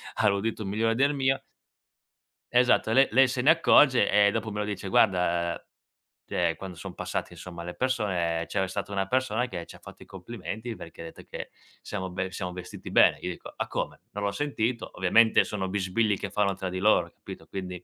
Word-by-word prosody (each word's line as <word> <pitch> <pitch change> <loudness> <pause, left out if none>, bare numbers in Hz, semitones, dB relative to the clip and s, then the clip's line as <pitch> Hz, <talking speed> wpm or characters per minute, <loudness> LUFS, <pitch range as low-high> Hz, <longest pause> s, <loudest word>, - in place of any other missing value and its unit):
ha 110 - +2
l'udito 105 +2 0
migliore 110 +3 0
del 140 +4 +3
mio 135 -1 +1 1.1
Esatto 125 -2 +3
le 135 +4 +5
lei 130 +4 +6
se 125 0 -2
ne 140 - +4
accorge 145 -8 +5
e 100 0 +5
dopo 110 +2 -3
me 105 - -4
lo 105 - -1
dice: 100 -2 -5
"Guarda, 85 -4 +2 0.7
cioè 85 -2 0
quando 95 -2 -8
son - - -8
passate, - - -4
insomma, 85 -2 -9
le 90 +1 -6
persone 90 -10 -1
c'era 95 -1 -1
stata 100 +2 -5
una 95 -1 -1
persona 125 0 0
che 90 -8 -6
c'ha - - -13
fatto - - -13
i - - -17
complimenti 110 +3 -7
perché 85 -4 -11
ha - - -6
detto 80 - -11
che - - -6 0.3
siamo 95 -3 -5
be 95 +1 -3
siamo 90 -1 -4
vestiti 90 0 -9
bene." - - +5
Io - - -3
dico: - - -10
"Ah - - -3
come? - - -4
Non 105 - -5
l'ho 100 - +1
sentito." 120 -2 -2
Ovviamente 110 +5 +4
sono 95 -2 -3
bisbigli 100 +2 0
che 100 - -5
fanno 100 0 +1
tra 95 0 -4
di 95 +1 -4
loro 105 +3 +4
hai - - -21
capito, - - -11
quindi 90 -2 -6
100 Hz, 200 wpm, -27 LUFS, 95-115 Hz, 1.1 s, lei